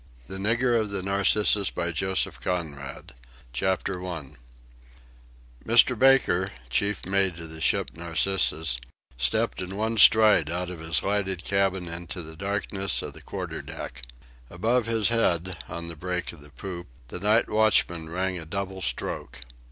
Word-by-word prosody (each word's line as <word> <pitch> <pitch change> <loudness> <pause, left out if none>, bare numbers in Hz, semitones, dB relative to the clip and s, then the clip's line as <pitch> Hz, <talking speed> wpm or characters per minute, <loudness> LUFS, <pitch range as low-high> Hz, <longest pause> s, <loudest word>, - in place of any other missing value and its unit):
C. - - -9
THE 95 - -5
NIGGER 120 +4 +2
OF 110 -2 -1
THE 100 -2 -3
"NARCISSUS" 100 0 +2 1.8
CHAPTER 95 +6 -1
ONE 85 -7 -7 1.3
Mr. 115 +1 +5
Baker, 130 -9 +4 0.2
chief 100 +9 0
mate 95 -2 +1
of 80 -1 -8
the 80 0 -8
ship - - +2
Narcissus, 80 -4 +1 0.4
stepped 110 - 0
in 90 +1 -5
one 110 +2 -1
stride 105 -8 +7
out 90 +1 -3
of 90 - -8
his 80 0 0
lighted 95 -2 -1
cabin 95 -2 0
into 85 +1 -6
the 80 0 -10
darkness 100 +1 -1
of - - -6
the - - -12
quarter - - -6
deck. 65 +1 -8 0.5
Above 115 +6 0
his 115 -2 +2
head, 95 -6 +1
on 85 0 -6
the 85 - -6
break 90 +2 -3
of 80 - -14
the 75 - -14
poop, 85 +3 -7 0.2
the 90 - -6
night 105 +4 +3
watchman 95 -7 +2
rang 90 +1 -2
a 80 - -8
double 95 +2 -4
stroke. 60 -4 -1
95 Hz, 145 wpm, -26 LUFS, 85-105 Hz, 1.8 s, stride